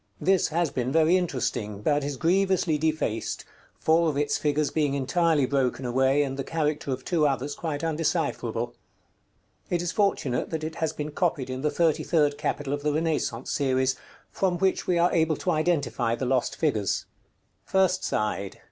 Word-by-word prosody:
This 190 Hz, 0 st, +3 dB
has 165 Hz, 0 st, 0 dB
been 125 Hz, 0 st, -2 dB
very 160 Hz, +3 st, +4 dB
interesting, 125 Hz, -, -2 dB
but 145 Hz, +2 st, +2 dB
is 140 Hz, -1 st, -3 dB
grievously 185 Hz, -1 st, +2 dB
defaced, 155 Hz, -8 st, -1 dB, 0.3 s
four 165 Hz, +1 st, +3 dB
of 145 Hz, -, -2 dB
its 145 Hz, 0 st, +1 dB
figures 150 Hz, 0 st, 0 dB
being 145 Hz, -3 st, +1 dB
entirely 150 Hz, +1 st, +2 dB
broken 130 Hz, -1 st, 0 dB
away, 130 Hz, +3 st, +3 dB
and 135 Hz, -1 st, -4 dB
the 135 Hz, -, -2 dB
character 150 Hz, -1 st, -2 dB
of 130 Hz, 0 st, -4 dB
two 160 Hz, -4 st, +2 dB
others 140 Hz, +1 st, -1 dB
quite 150 Hz, -2 st, -4 dB
undecipherable. 150 Hz, -8 st, -1 dB, 1.0 s
It 175 Hz, -, +1 dB
is 175 Hz, 0 st, -2 dB
fortunate 200 Hz, -, 0 dB
that 160 Hz, -1 st, -3 dB
it 160 Hz, +1 st, -3 dB
has 160 Hz, -2 st, 0 dB
been 150 Hz, -1 st, -5 dB
copied 150 Hz, -6 st, -1 dB
in 130 Hz, 0 st, -4 dB
the 150 Hz, -, +1 dB
thirty 160 Hz, +1 st, +2 dB
third 150 Hz, -4 st, +1 dB
capital 145 Hz, -1 st, -2 dB
of 145 Hz, -, -2 dB
the 150 Hz, +1 st, +1 dB
Renaissance 155 Hz, -6 st, -1 dB
series, 130 Hz, -2 st, +1 dB, 0.4 s
from 185 Hz, -2 st, 0 dB
which 190 Hz, +1 st, 0 dB
we 180 Hz, -, +2 dB
are 170 Hz, +1 st, +3 dB
able 160 Hz, -2 st, +2 dB
to 180 Hz, -, -1 dB
identify 155 Hz, -8 st, 0 dB
the 130 Hz, -, -3 dB
lost 125 Hz, -1 st, 0 dB
figures. 110 Hz, -, 0 dB, 0.6 s
_First 190 Hz, -1 st, +3 dB
side. 100 Hz, -2 st, -2 dB
150 Hz, 175 wpm, -26 LUFS, 130-165 Hz, 1.0 s, very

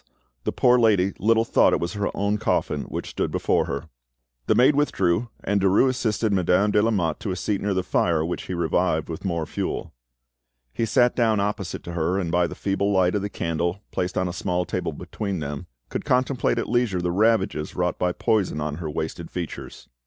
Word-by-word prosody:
the -, -, +1 dB
poor 125 Hz, 0 st, +4 dB
lady 100 Hz, -5 st, +3 dB
little 115 Hz, +2 st, +3 dB
thought -, -, +4 dB
it -, -, +2 dB
was 85 Hz, -, -3 dB
her 105 Hz, 0 st, -1 dB
own 100 Hz, +1 st, 0 dB
coffin -, -, 0 dB
which -, -, -5 dB
stood -, -, -1 dB
before -, -, +1 dB
her! 70 Hz, +2 st, -4 dB, 0.6 s
The -, -, +3 dB
maid 130 Hz, +4 st, +5 dB
withdrew, 115 Hz, -6 st, +1 dB
and 100 Hz, 0 st, +1 dB
Derues 100 Hz, +7 st, +4 dB
assisted 110 Hz, -4 st, 0 dB
Madame 95 Hz, +2 st, +3 dB
de 105 Hz, -, +4 dB
Lamotte 105 Hz, -7 st, 0 dB
to 105 Hz, -, -4 dB
a 95 Hz, -, -1 dB
seat 100 Hz, +2 st, -2 dB
near 100 Hz, -1 st, 0 dB
the 95 Hz, -, 0 dB
fire, 80 Hz, -3 st, +1 dB
which 85 Hz, -, -4 dB
he 95 Hz, -, -3 dB
revived 85 Hz, -1 st, 0 dB
with 80 Hz, -, -6 dB
more 85 Hz, -4 st, -1 dB
fuel. -, -, -4 dB, 0.8 s
He 115 Hz, -, -1 dB
sat 120 Hz, +3 st, +3 dB
down 110 Hz, -3 st, +2 dB
opposite 100 Hz, -2 st, -2 dB
to 85 Hz, -, -7 dB
her, 85 Hz, +2 st, 0 dB
and 90 Hz, -4 st, -2 dB
by 90 Hz, 0 st, +2 dB
the -, -, -8 dB
feeble 100 Hz, +1 st, 0 dB
light 95 Hz, -2 st, +3 dB
of 105 Hz, -, 0 dB
the 100 Hz, -, -3 dB
candle 85 Hz, +3 st, -2 dB
placed 90 Hz, 0 st, -2 dB
on 90 Hz, -, +1 dB
a 90 Hz, -, -4 dB
small 90 Hz, -1 st, -1 dB
table -, -, -2 dB
between 100 Hz, -3 st, -4 dB
them 75 Hz, -2 st, -5 dB, 0.2 s
could -, -, -3 dB
contemplate 130 Hz, 0 st, +1 dB
at -, -, -1 dB
leisure 120 Hz, -6 st, +1 dB
the 90 Hz, 0 st, -1 dB
ravages 100 Hz, -5 st, +1 dB
wrought 90 Hz, 0 st, -1 dB
by 90 Hz, 0 st, +1 dB
poison 95 Hz, -4 st, 0 dB
on 75 Hz, 0 st, -3 dB
her 85 Hz, -3 st, -4 dB
wasted 80 Hz, +2 st, -4 dB
features. 90 Hz, -3 st, -7 dB
95 Hz, 205 wpm, -24 LUFS, 85-105 Hz, 0.8 s, maid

